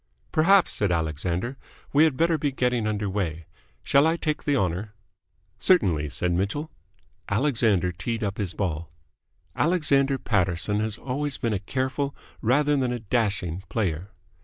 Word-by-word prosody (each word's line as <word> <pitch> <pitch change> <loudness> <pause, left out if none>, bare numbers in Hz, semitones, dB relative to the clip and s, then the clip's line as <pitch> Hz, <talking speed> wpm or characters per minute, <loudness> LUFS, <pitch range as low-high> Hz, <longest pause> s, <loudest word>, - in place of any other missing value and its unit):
"Perhaps," 185 +4 +4
said 100 -3 0
Alexander, 85 - -1 0.4
"we 150 +3 +6
had 150 -5 0
better 165 0 +3
be 145 0 0
getting 125 -4 0
under 105 -1 -1
way. 85 -5 -3 0.4
Shall 140 +3 +4
I 165 +1 +1
take 155 -2 -2
the 145 -2 +2
honour?" 95 +2 -2 0.6
"Certainly," 85 - +3
said 90 +4 -1
Mitchell. 100 - -1 0.6
Alexander 110 - +2
teed 110 +6 -3
up 100 0 -3
his 90 -5 -2
ball. 85 -5 -2 0.7
Alexander 140 -5 +2
Paterson 95 -3 0
has 110 0 -1
always 140 +3 -2
been 115 -2 -1
a 100 - 0
careful 130 +6 -2 0.3
rather 145 +5 +3
than 130 -3 0
a 125 - -1
dashing 100 -6 -1
player. 95 -4 -2
110 Hz, 145 wpm, -25 LUFS, 90-140 Hz, 0.7 s, we